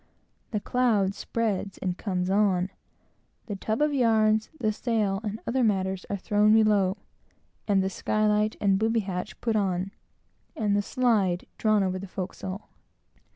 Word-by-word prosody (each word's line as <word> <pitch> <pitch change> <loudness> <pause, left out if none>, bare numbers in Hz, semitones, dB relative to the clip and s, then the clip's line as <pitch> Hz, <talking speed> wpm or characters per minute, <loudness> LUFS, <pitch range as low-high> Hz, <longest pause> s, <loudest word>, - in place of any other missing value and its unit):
The 215 - -1
cloud 215 -5 +1
spreads 205 -3 -2
and 180 -2 -2
comes 185 -2 -2
on; 195 -2 +2 0.7
the 205 - -4
tub 220 +7 -1
of 300 -1 +1
yarns, 220 -4 +3
the 215 -3 +1
sail, 210 -4 0
and 215 0 -4
other 255 +2 +1
matters, 190 -3 0
are 200 - -1
thrown 210 +2 +3
below, 210 -3 +3 0.7
and 195 -2 +3
the 190 - 0
sky 215 +3 0
light 210 0 +2
and 195 -2 +2
booby 225 +1 +2
hatch 190 0 -5
put 230 -2 0
on, 190 -2 0 0.6
and 205 -2 +1
the 205 - +2
slide 205 -7 +1
drawn 215 -2 +3
over 185 0 -1
the 195 - -7
forecastle. 190 +1 -6
205 Hz, 155 wpm, -27 LUFS, 190-220 Hz, 0.7 s, yarns